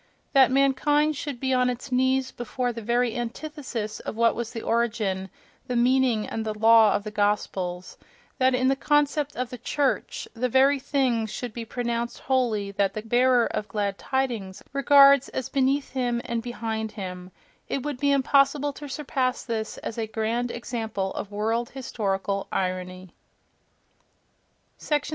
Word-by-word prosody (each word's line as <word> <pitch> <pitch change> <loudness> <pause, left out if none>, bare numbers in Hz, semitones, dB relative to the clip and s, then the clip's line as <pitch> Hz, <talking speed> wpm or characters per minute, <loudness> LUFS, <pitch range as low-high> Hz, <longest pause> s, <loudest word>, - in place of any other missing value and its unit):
That 270 -2 +6
mankind 275 +3 +2
should 280 -3 -5
be 265 0 0
on 250 0 +3
its 250 +2 -5
knees 260 +1 +2
before 245 +1 -3
the 230 - -6
very 240 +1 +1
antithesis 240 -3 -5
of - - -6
what 230 0 +3
was 235 0 -4
the 230 - -6
origin, 215 -5 0 0.4
the 250 - -2
meaning 245 -2 +3
and 225 - -4
the 215 -1 -3
law 225 -1 +6
of 205 - -1
the 215 - -6
Gospels—that 205 +5 -2
in 255 +1 +2
the 270 - +3
concept 295 +1 +1
of 250 -1 -3
the 250 - -7
"church" 280 +3 -1
the 250 +2 -1
very 270 +3 +4
things 255 -5 0
should 245 -3 -5
be 235 -1 -6
pronounced 235 0 -3
holy 230 -7 0
that 195 -1 0
the 215 - -4
"bearer 245 +1 +3
of 210 - -3
glad 200 -1 -2
tidings" 235 -8 -2
regards 275 0 +6
as 260 - -4
beneath 275 +1 +1
him 245 -2 0
and 235 -1 -2
behind 225 -2 -4
him—it 185 +6 -7
would 290 -4 -4
be 285 - +2
impossible 280 +1 +3
to 290 +1 -9
surpass 260 -3 -1
this 220 -2 -4
as 230 - -4
a 220 - -2
grand 225 +3 -1
example 225 -5 -3
of 200 - -5
world 225 +3 -1
historical 200 -6 -2
irony— 185 -1 -3 1.7
37. 295 -1 0
240 Hz, 155 wpm, -25 LUFS, 215-265 Hz, 1.7 s, That